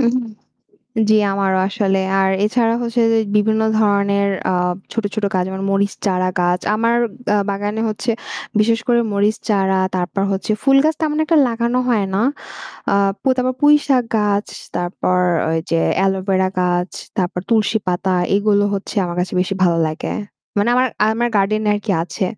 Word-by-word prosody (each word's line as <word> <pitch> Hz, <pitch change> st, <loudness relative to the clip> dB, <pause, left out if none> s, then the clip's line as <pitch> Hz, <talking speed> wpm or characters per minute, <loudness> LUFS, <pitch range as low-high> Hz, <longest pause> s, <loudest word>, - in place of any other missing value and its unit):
উম 240 Hz, -1 st, +2 dB, 1.0 s
জি 215 Hz, -, +6 dB, 0.2 s
আমারও 195 Hz, -1 st, +1 dB
আসলে। 200 Hz, -2 st, 0 dB, 0.2 s
আর 190 Hz, 0 st, +2 dB
এছাড়া 230 Hz, +1 st, +1 dB
হচ্ছে 235 Hz, 0 st, -1 dB
যে 225 Hz, -, +3 dB, 0.2 s
বিভিন্ন 220 Hz, +1 st, +2 dB, 0.2 s
ধরনের 200 Hz, -1 st, +2 dB, 0.2 s
আ -, -, +1 dB, 0.4 s
ছোট, 225 Hz, -, -2 dB
ছোট 215 Hz, -2 st, -2 dB
গাছ 185 Hz, -, +2 dB
যেমন 190 Hz, 0 st, -5 dB
মরিচ 200 Hz, 0 st, +1 dB
চারা 185 Hz, -1 st, +1 dB
গাছ। 175 Hz, +1 st, +1 dB
আমার 230 Hz, +2 st, +1 dB, 0.4 s
আ -, -, +3 dB
বাগানে 205 Hz, +2 st, -3 dB
হচ্ছে 220 Hz, +3 st, -2 dB, 0.5 s
বিশেষ 225 Hz, +1 st, +2 dB
করে 240 Hz, -1 st, +4 dB
মরিচ 205 Hz, +2 st, +1 dB
চারা 190 Hz, -2 st, +2 dB, 0.2 s
তারপর 180 Hz, +2 st, -2 dB
হচ্ছে 195 Hz, +2 st, -2 dB
ফুল 270 Hz, 0 st, +5 dB
গাছ 315 Hz, -, +2 dB
তেমন 300 Hz, -1 st, 0 dB
একটা 325 Hz, +1 st, +2 dB
লাগানো 235 Hz, +1 st, -1 dB
হয় 215 Hz, -5 st, +1 dB
না। 200 Hz, -, +1 dB, 0.7 s
আ -, -, +3 dB, 0.3 s
প -, -, -65 dB
তারপর 255 Hz, 0 st, 0 dB
পুইশাক 290 Hz, -3 st, +4 dB
গাছ, 205 Hz, -1 st, +1 dB, 0.3 s
তারপর 175 Hz, +1 st, -1 dB, 0.3 s
ওই 165 Hz, -, +1 dB
যে 165 Hz, 0 st, +2 dB, 0.2 s
অ্যালোভেরা 190 Hz, -1 st, +1 dB
গাছ, 180 Hz, 0 st, 0 dB, 0.3 s
তারপর 180 Hz, -1 st, -1 dB
তুলসী 220 Hz, -1 st, +2 dB
পাতা, 180 Hz, +1 st, 0 dB, 0.2 s
এগুলো 205 Hz, 0 st, +2 dB
হচ্ছে 200 Hz, +2 st, -6 dB
আমার 175 Hz, -1 st, -4 dB
কাছে 180 Hz, -, -3 dB
বেশি 190 Hz, +2 st, -1 dB
ভালো 170 Hz, -2 st, +3 dB
লাগে। 155 Hz, -, -4 dB, 0.5 s
মানে 205 Hz, +3 st, +2 dB
আমার 255 Hz, +1 st, +3 dB, 0.2 s
আমার 240 Hz, +2 st, 0 dB
গার্ডেনে 210 Hz, +2 st, +1 dB
আর 205 Hz, -, -3 dB
কি 210 Hz, -, -2 dB
আছে। 185 Hz, +2 st, -3 dB
205 Hz, 165 wpm, -18 LUFS, 190-230 Hz, 1.0 s, জি